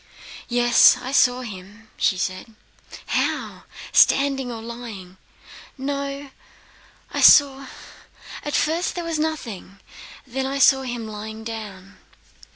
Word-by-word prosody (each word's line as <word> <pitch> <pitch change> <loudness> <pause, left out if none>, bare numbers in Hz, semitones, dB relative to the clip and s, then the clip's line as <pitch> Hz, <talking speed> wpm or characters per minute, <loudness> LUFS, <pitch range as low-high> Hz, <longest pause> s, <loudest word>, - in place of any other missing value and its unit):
"Yes, 240 0 +5
I 255 - -6
saw 250 -2 +3
him," 210 0 -11
she 190 - +1
said. 185 +5 -5 0.5
"How? - - -2 0.3
Standing 270 -2 +3
or 230 - -6
lying?" 225 -6 -9 0.6
"No, 280 0 -5 0.8
I - - -2
saw... 275 -2 +6 0.7
At 295 - -4
first 330 +3 0
there 350 - -4
was 330 -2 -3
nothing, 235 - -5 0.5
then 265 +1 -3
I 275 +1 -3
saw 270 0 +5
him 240 -3 -5
lying 220 +1 -8
down." 205 -4 -8
245 Hz, 115 wpm, -22 LUFS, 220-275 Hz, 0.8 s, saw